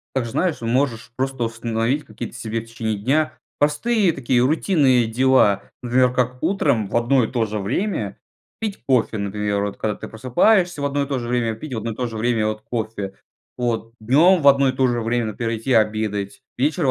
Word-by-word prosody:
Также, 120 -3 -1
знаешь, 180 0 0
можешь 120 0 -1
просто 130 -1 -1
установить 115 +4 -1
какие-то 110 - -7
себе 115 -2 -3
в - - -13
течение 110 -2 -3
дня 140 +9 0 0.2
простые 185 +6 +2
такие 125 -2 +1
рутинные 140 - +3
дела. 115 -4 +3 0.2
Например, 125 +1 +3
как 125 0 -1
утром 140 - +1
в - - -5
одно 120 +1 +3
и - - -4
то 120 -3 0
же 105 0 -4
время 160 - -2 0.4
пить 215 -3 -4
кофе, 125 -4 +2
например. 100 0 -1
Вот 100 - -4
когда 105 - -1
ты - - -8
просыпаешься 160 - +2
в - - 0
одно 140 0 0
и - - -3
то 135 -2 -2
же 120 - -5
время, 120 -2 0
пить 130 +5 -8
в - - -2
одно 115 +1 -4
и - - -7
то 125 +1 -2
же 115 - -8
время, 115 -1 +1
вот, 110 0 -3
кофе, 110 -4 -4 0.4
вот. 115 -2 -2
Днем 155 - +4
в 140 - +3
одно 140 -1 +6
и - - +2
то 130 0 +1
же 120 -1 0
время, 115 +1 0
например, 115 +2 -3
идти 120 +4 -1
обедать. 105 -2 0 0.2
Вечером 145 +2 +1
120 Hz, 200 wpm, -21 LUFS, 110-135 Hz, 0.4 s, одно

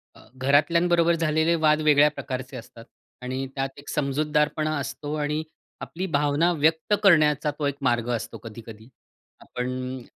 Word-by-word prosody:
अ, - - -17 0.2
घरातल्यांबरोबर, 170 +5 +3
झालेले 160 +1 +1
वाद 155 -1 +2
वेगळ्या 150 -1 +5
प्रकारचे 130 0 -6
असतात 115 0 -12 0.4
आणि 130 +1 -3
त्यात 135 0 -2
एक 140 0 -12
समजूतदारपणा 150 +2 0
असतो 140 +2 -5
आणि 150 +1 -2 0.4
आपली 185 +3 -5
भावना 150 +4 +2
व्यक्त 160 +5 +1
करण्याचा, 150 -5 +4
तो 145 0 -5
एक 140 - -2
मार्ग 120 -2 0
असतो - - -6
कधी-कधी. 110 0 -11 0.5
आपण 130 +1 -5
145 Hz, 135 wpm, -25 LUFS, 130-155 Hz, 0.5 s, वेगळ्या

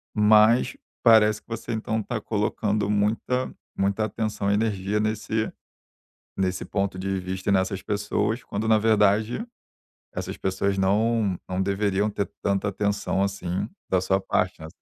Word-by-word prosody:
mas 110 +2 +5 0.3
parece 110 -2 +5
que - - -55
você 115 0 -5
então 110 0 -1
tá 110 +2 -3
colocando 105 -1 -1
muita 110 +5 0 0.2
muita 100 +2 +1
atenção 110 -2 -2
e 100 - +3
energia 105 -1 0
nesse 110 0 -1 0.8
nesse 95 -1 -1
ponto 100 -2 -2
de 95 0 -1
vista 95 +1 -5
e - - +4
nessas 95 0 +1
pessoas, 105 +2 -1
quando, 105 +2 -3
na 110 -1 +5
verdade, 110 - +2 0.7
essas - - -4
pessoas 95 +1 -1
não 105 0 +2
não 95 +1 -2
deveriam 100 +1 +1
ter 100 0 -3
tanta 100 0 +1
atenção 100 0 0
assim 95 -2 -2 0.2
da 95 - +3
sua 95 +1 +1
parte, - - -1
né. 80 - -7
105 Hz, 145 wpm, -25 LUFS, 95-110 Hz, 0.8 s, mas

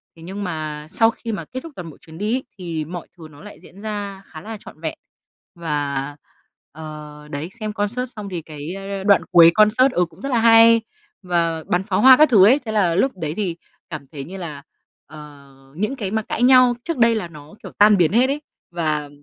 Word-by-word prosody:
Thế 165 - -15
nhưng 195 +3 -6
mà 155 -4 -5
sau 225 +5 +5
khi 230 - -7
mà 205 - -5
kết 260 - -7
thúc 330 - -10
toàn 175 -2 -8
bộ 150 - -14
chuyến 160 0 -13
đi 210 +6 -1
ấy, 260 - -3
thì 165 -4 -4
mọi 175 +1 -8
thứ 160 -2 -11
nó 145 - -16
lại 210 - -12
diễn 195 - -16
ra 205 -2 -5
khá 155 - -12
là 220 +4 -8
trọn 155 - -14
vẹn. 160 -1 -4 0.6
Và, 145 -4 -3 0.6
ờ, 150 -1 -10
đấy, 145 +4 -5
xem 215 -1 -4
concert 235 +5 -2
xong 210 -2 -7
thì 175 -3 -5
cái, 155 +2 -8
ơ, 195 0 -6
đoạn 200 -1 +4
cuối 170 -2 +8
concert, 220 +5 +4
ừ, 180 - +2
cũng 160 - -19
rất 275 - -4
là 245 -3 +1
hay 230 0 +6 0.4
và 170 -2 -1
bắn 180 +2 0
pháo 195 -1 -1
hoa 260 +1 +8
các 305 +1 +5
thứ 200 -6 +6
ấy. 260 +7 +5
Thế 220 - -4
là 185 -6 +1
lúc 260 +8 +2
đấy 155 -3 -4
thì 185 -5 -2 0.3
cảm 150 -5 -8
thấy 140 -3 -7
như 190 +5 -9
là, 150 -6 -7 0.4
ờ, 145 -2 -14 0.2
những 215 - -2
cái 200 -6 -5
mà 220 0 0
cãi 230 - -3
nhau 255 -1 +6
trước 335 -5 -4
đây 230 -1 +4
là 205 -5 -3
nó, 155 +1 -14
kiểu, - - -9
tan 210 0 +6
biến 170 -3 +3
hết 245 +3 +4
ấy. 285 +2 -3 0.3
Và 155 -4 -2
185 Hz, 230 wpm, -20 LUFS, 155-220 Hz, 0.6 s, cuối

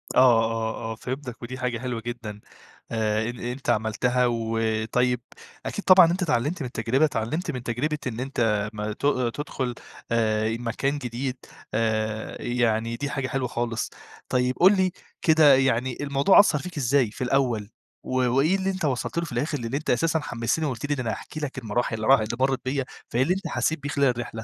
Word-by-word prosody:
آه، 120 -3 +6
آه، 115 0 -3
آه، - - -4
فهمتك، 125 +1 -6
ودي 125 +2 -6
حاجة 125 -2 -2
حلوة 125 -2 -3
جدًا 115 -3 -6 0.5
آآ 110 0 0
أنت 120 +2 -5
عملتها. 120 +3 +1
و 115 -1 -1 0.3
طيب 125 -1 +2 0.4
أكيد 205 - -4
طبعًا 185 -2 +9
أنت 185 +2 -2
اتعلمت 150 +1 0
من 130 - -2
التجربة، 120 +5 +1
اتعلمت 145 - -2
من 125 -2 -6
تجربة 140 +6 -1
إن 120 -1 -4
أنت 115 -6 0
ما 105 0 -3
ت - - -17 0.3
تدخل 130 -4 -3 0.4
آآ 110 -1 +2
مكان 135 +4 -1
جديد، 125 0 -4 0.4
آآ 110 0 -1
يعني 115 -1 0
دي 140 +4 -3
حاجة 135 -2 -2
حلوة 130 -1 -1
خالص. 120 -1 -2 0.4
طيب 125 0 +1
قُل 190 +3 +7
لي 185 -1 +2 0.3
كده 155 -4 +6
يعني 130 -1 +1
الموضوع 140 +6 +5
أثّر 175 -7 +5
فيك 175 +1 -8
إزاي 130 -3 +2
في 120 - -5
الأول، 125 -5 +1 0.3
و - - -7 0.2
وإيه 140 +9 +3
اللي 190 0 -1
أنت 185 -3 -2
وصلت 135 +3 -2
له 170 - +1
في - - -9
الآخر، 145 +5 -1
اللي 120 +3 -2
أنت 150 - -5
أساسًا 160 +6 +2
حمستني 120 +2 -1
وقلت 130 -3 -3
لي 145 - 0
إن 140 - -4
أنا 115 -3 -1
هاحكي 155 - -7
لك 145 -3 -4
المراحل 120 -1 -1
اللي 110 0 -3
راح 135 0 +7
اللي 110 +2 -3
مرت 135 0 +1
بيا، 135 0 -1 0.2
فإيه 120 - +1
اللي 170 - +2
أنت 190 +2 -4
حسيت 160 - 0
بيه 145 - -5
خلال 140 -1 +2
الرحلة؟ 120 -2 -3
125 Hz, 190 wpm, -25 LUFS, 115-140 Hz, 0.5 s, طبعًا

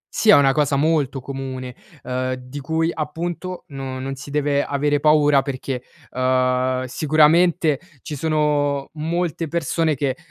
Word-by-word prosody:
Sì, 220 - +2
è - - +10
una 140 -1 +5
cosa 145 0 +1
molto 145 -2 +1
comune, 130 -2 -6 0.3
uhm, 130 0 -2
di 130 +2 -9
cui 160 +4 0
appunto, 170 +4 -4
no 135 -2 -6
non 135 +1 -4
si 135 +1 -9
deve 145 0 +1
avere 145 +1 0
paura 150 -2 +4
perché, 135 -2 -4 0.3
uhm, 130 0 +1
sicuramente 155 +3 +3 0.2
ci 150 - -5
sono 145 -2 0
molte 165 +1 -2
persone 165 0 0
che, 135 -1 -1
145 Hz, 140 wpm, -21 LUFS, 130-155 Hz, 0.3 s, è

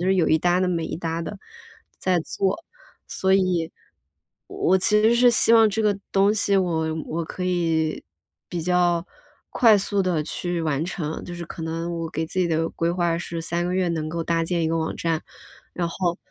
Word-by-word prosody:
就 185 +2 +1
有 185 -4 +3
一 160 - +4
搭 175 +2 +2
地 185 - +2
没 170 -2 -1
一 - - -4
搭 165 -1 -3
地， 200 +5 -6 0.6
在 185 -2 +1
做。 195 - -2 0.4
所 190 0 0
以， 180 -4 +1 0.8
我 190 +2 +2
其 210 +3 +3
实 225 +2 +4
是 245 0 +5
希 230 - +4
望 225 -1 +7
这 220 +2 -1
个 205 -2 +2
东 200 +1 +4
西 200 -2 +1
我 165 -4 0 0.2
我 165 +1 -3
可 180 - -6
以， 165 -3 0 0.5
比 175 -2 -3
较 175 0 +2 0.5
快 225 -3 +6
速 200 0 0
地 175 -5 0
去 175 +2 -3
完 155 -1 0
成， 160 -4 -4
就 175 - -7
是 170 - -6
可 165 - -9
能 165 +1 -3
我 165 -1 -4
给 160 +1 -3
自 185 +3 -4
己 175 - +2
的 165 0 0
规 165 +1 -1
划 175 -2 0
是 170 -1 -5
3 170 +1 -2
个 180 - -2
月 185 -1 +1
能 155 -2 -2
够 165 0 -3
搭 165 0 0
建 170 0 -1
一 160 - +1
个 165 0 0
网 160 0 -2
站。 165 -2 -1 0.5
然 175 -1 -1
后， 175 -1 -1
175 Hz, 215 characters per minute, -24 LUFS, 165-185 Hz, 0.8 s, 望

